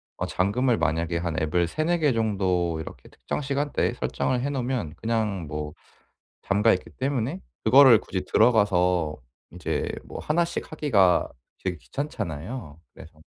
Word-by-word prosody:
어 - - -3
잠금을 115 +6 +1
만약에 85 +1 0
한 85 -1 -2
앱을 85 +3 +1
3-4 165 - 0
개 150 -4 +3
정도 95 -7 0
이렇게 80 - -9
특정 - - -5
시간대에 140 +1 -1
설정을 125 -1 -1
해 140 - -1
놓으면 125 - -2
그냥 110 -6 -1
뭐 75 0 -5 0.7
잠겨 105 +3 +3
있기 90 - -4
때문에 135 +4 -1 0.2
그거를 130 -5 +8
굳이 95 -4 -4
들어가서 90 -8 +3 0.4
이제 90 -3 -2 0.2
뭐 - - -8
1 170 +3 +1
씩 170 - -5
하기가 110 - +3 0.3
되게 90 -2 -2
귀찮잖아요. 95 - -5
그래서 80 -1 -14
105 Hz, 290 characters per minute, -25 LUFS, 85-130 Hz, 0.7 s, 그거를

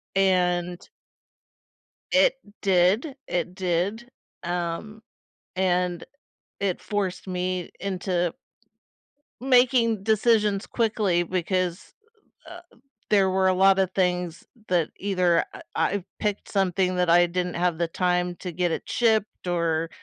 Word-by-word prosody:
And 180 -2 +1 1.3
It - - +4 0.2
did. 195 - +2
It 180 0 -2
did. 190 +6 -2 0.3
Um, 175 +5 -4 0.6
and 180 -2 0 0.6
it 195 -3 -1
forced 200 -3 -3
me 180 -1 -3
into 180 -2 -2 1.1
making 245 -4 +3
decisions 215 -2 +2
quickly 210 -6 +1
because, 185 +1 -2 0.6
uh, 350 0 -9 0.5
there 195 -2 +4
were 190 0 +2
a 185 - +4
lot 195 +1 +5
of 190 -1 +1
things 180 -3 -1 0.2
that 175 -3 +1
either 180 -4 +1
I - - -10
I 180 +4 0 0.2
picked 210 -2 -3
something 185 -2 +1
that 180 -1 +1
I 175 +1 +6
didn't 180 +1 -2
have 175 -1 0
the 170 0 0
time 180 0 0
to 180 - -6
get 175 +1 -1
it - - -2
shipped 220 -5 0
or 165 -2 0
185 Hz, 115 wpm, -25 LUFS, 175-200 Hz, 1.3 s, I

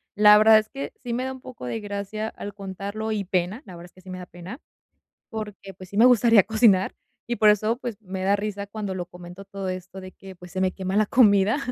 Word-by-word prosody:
la 210 0 +8
verdad 215 +1 +7
es 215 0 -7
que 275 0 -6
sí 245 -3 -4
me 250 +2 -1
da 265 0 -3
un 260 - -12
poco 250 - -10
de 125 - -3
gracia 205 +1 -4
al 205 -2 -8
contarlo 200 +2 -5
y 210 -2 -1
pena, 185 - -2
la 185 - -11
verdad 170 0 -11
es 175 - -25
que 185 - -18
sí 185 0 -11
me 185 - -6
da 180 - -9
pena, 175 - -10 0.7
porque 210 -3 -7
pues 185 0 -13
sí 200 - -9
me 225 - +6
gustaría 235 -3 +6
cocinar 215 -3 +3 0.4
y 240 - -1
por 215 - +4
eso 215 +2 +3
pues 240 -3 -6
me 190 -1 -5
da 200 +1 +3
risa 205 0 -3
cuando 205 -2 -5
lo 175 -1 -4
comento 180 +2 -12
todo 195 -1 -6
esto 185 +1 -6
de 185 0 -9
que 190 +1 -13
pues 180 0 -14
se 185 - -4
me 185 -1 +1
quema 190 0 -3
la 215 0 +3
comida, 205 0 +4
200 Hz, 250 wpm, -24 LUFS, 185-220 Hz, 0.7 s, la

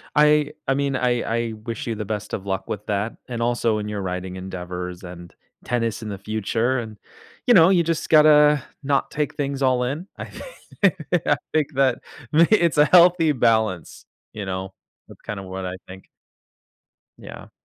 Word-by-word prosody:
I 150 0 +4 0.2
I 135 - +3
mean, 140 -1 -1
I 125 -2 +1 0.3
I - - -6
wish 115 0 -5
you 115 - -2
the 105 - -5
best 105 0 -5
of 95 - -4
luck 95 -1 -3
with 105 0 -5
that 105 +2 -1 0.2
and 120 -2 -4
also 115 -2 +1
in 105 0 -4
your 105 -1 -4
writing 90 0 -4
endeavors, 90 -1 -6
and 90 -1 -10 0.3
tennis 115 -2 -2
in 110 - -6
the 100 - -5
future, 110 +5 -1
and, 110 -3 -8 0.5
you 245 - +5
know, 170 -3 +7
you 175 -3 +4
just 165 -1 -2
gotta 150 -2 +6 0.2
not 140 0 0
take 150 -2 -2
things 140 -1 -3
all-in. 130 +7 0
I - - -6
thi - - -11 0.8
I 145 - +3 0.2
think 155 -3 +2
that 135 -2 +2 0.3
may 165 +2 +5
it's 170 -7 +3
a 150 - +6
healthy 175 -1 +5
balance, 110 - 0 0.3
you 105 -2 -6
know? 95 0 -5 0.3
That's - - -16
kinda 100 -2 -6
what 95 0 -6
I 90 - -4
think. 95 +1 -12 1.1
Yeah. - - -11
115 Hz, 175 wpm, -22 LUFS, 100-150 Hz, 1.1 s, know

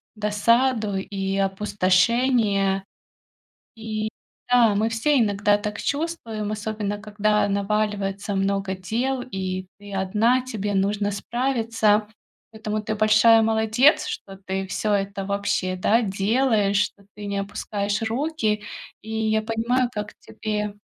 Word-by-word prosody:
досаду 215 +1 +1
и 195 0 -3
опустошение. 195 +1 +2 0.9
И, 215 -1 -3 0.4
да, 240 -4 +5
мы 215 +2 +1
все 230 +5 +2
иногда 205 -1 +2
так 210 0 -5
чувствуем, 260 -9 -3
особенно 210 -1 -3
когда 210 0 +1
наваливается 200 0 -1
много 195 0 0
дел 240 +8 -2
и 185 -5 -4
ты 205 0 -11
одна, 215 +7 +2
тебе 210 -5 -3
нужно 205 +1 0
справиться. 225 -2 +1 0.4
Поэтому 215 -1 -3
ты 215 0 -3
большая 220 +1 +5
молодец, 220 +5 +3
что 195 -1 -6
ты 190 0 -3
всё 210 +3 -1
это, 200 -1 -1
вообще, 200 -2 -1
да, 220 +6 +2
делаешь, 205 0 +1
что 200 -1 -5
ты 205 0 -8
не 200 0 -2
опускаешь 200 +1 -3
руки. 225 -3 -1 0.4
И 220 - -10 0.2
я 220 0 +2
понимаю, 235 +3 0
как 210 0 -5
тебе 210 -1 -4
210 Hz, 120 wpm, -23 LUFS, 200-225 Hz, 0.9 s, да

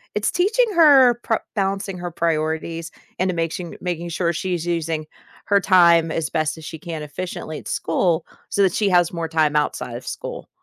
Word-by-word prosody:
it's 210 0 +1
teaching 425 +8 +2
her 270 -7 +6
prio 225 - +1 0.2
balancing 195 -1 -1
her 175 0 -5
priorities 165 0 -2 0.3
and 185 0 +1
making 165 +1 -3
making 175 -1 -3
sure 170 0 0
she's 175 -1 -2
using 165 -2 -2 0.4
her 200 -1 +4
time 170 -3 +5
as 155 -1 -2
best 155 -1 -1
as 160 - -10
she 160 - -7
can 160 -1 -6
efficiently 155 0 -6
at - - -12
school 165 0 0 0.2
so 200 - 0
that 185 -3 +3
she 205 -2 +1
has 175 -2 +3
more 170 -1 -3
time 155 -2 +2
outside 150 0 -1
of - - -8
school, - - -6
170 Hz, 180 wpm, -22 LUFS, 160-190 Hz, 0.4 s, her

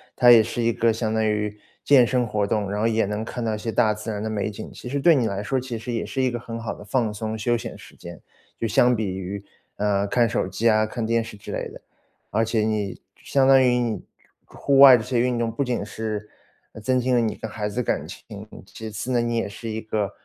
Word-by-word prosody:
它 120 -1 +6
也 115 -2 +9
是 115 +2 -3
一 115 0 +2
个 115 +1 +2
相 110 0 -2
当 110 0 +1
于 105 -1 -1 0.3
健 135 -4 +6
身 125 -1 +1
活 105 -2 -1
动， 105 -2 -1
然 105 +1 -2
后 115 - +3
也 110 -1 +1
能 105 +2 -3
看 120 +1 -5
到 110 - 0
一 - - -2
些 115 +1 -3
大 110 -2 +3
自 105 +1 -7
然 105 -2 -3
的 110 - -2
美 105 -1 -1
景， 105 - -8
其 125 - -9
实 140 +2 -1
对 165 +4 +6
你 125 -5 +1
来 100 -1 -3
说 130 +4 0
其 125 -2 -5
实 115 +2 -6
也 115 - -1
是 135 - -3
一 130 - +1
个 120 - -4
很 115 0 -7
好 115 -1 -4
的 - - -11
放 110 0 -1
松 110 +1 -4
休 120 +2 +1
闲 115 - -6
时 - - -15
间， 85 -2 -10 0.4
就 115 - -1
相 120 +3 +4
比 110 -1 -2
于， 95 +1 -5 0.3
呃， 100 -1 0
看 120 +3 +2
手 105 - -1
机 100 +5 -1
啊、 110 -1 +3
看 115 +1 -4
电 115 0 +1
视 110 - -10
之 100 - -9
类 - - -4
的。 - - -12 0.5
而 110 +2 +2
且 115 0 0
你 105 -3 -2 0.2
相 135 -1 +1
当 135 -1 +7
于 125 -1 +3
你 115 -5 -1 0.4
户 140 -1 0
外 135 -2 +10
这 110 - -5
些 125 0 -1
运 125 0 +1
动 115 -1 -1
不 115 +5 -1
仅 125 -5 -2
是 105 0 -5 0.5
增 130 +2 +1
进 125 +1 0
了 120 - +4
你 110 -2 -1
跟 110 - -7
孩 105 0 -3
子 125 +5 -2
感 - - -2
情， - - -10 0.4
其 110 -1 -8
次 110 +4 -5
呢， 120 -1 +2
你 120 0 -1
也 115 - -1
是 115 +3 -7
一 110 0 -3
个， 105 -2 -2
110 Hz, 280 characters per minute, -23 LUFS, 105-120 Hz, 0.5 s, 外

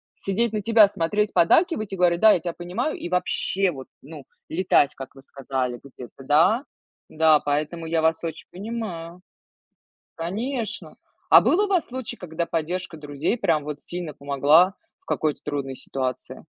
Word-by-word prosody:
сидеть 220 +4 -1
на 215 - -1
тебя 220 -1 +6
смотреть, 205 +4 -1
поддакивать 215 - +3
и - - -4
говорить: 175 -1 +3
"Да, 220 -1 +8
я - - +1
тя 170 +1 -4
понимаю". 175 - -3
И - - -6
вообще, 185 +1 0
вот, 135 -4 -9
ну, 145 -1 -11 0.2
летать, 160 -4 +2
как 135 -1 -9
вы 135 - -13
сказали 130 -3 -4
где-то, 135 -1 -12
да. 165 - +4 0.5
Да, 155 -1 +4
поэтому 150 +3 -2
я 165 0 +1
вас 160 0 +3
очень 165 -1 -6
понимаю. 180 -4 -6 0.9
Конечно. 220 +7 -4 0.3
А - - +10
был 350 - +2
у 415 - +1
вас 370 -5 +1
случай, 255 -2 -6
когда 170 -1 -4
поддержка 170 +1 -3
друзей 150 - -2
прям 160 -7 +1
вот 150 0 -6
сильно 175 -3 -6
помогла 145 +6 +4 0.3
в - - -39
какой-то 155 -2 -1
трудной 140 -2 -3
ситуации? 130 -1 -5
170 Hz, 160 wpm, -24 LUFS, 145-205 Hz, 0.9 s, А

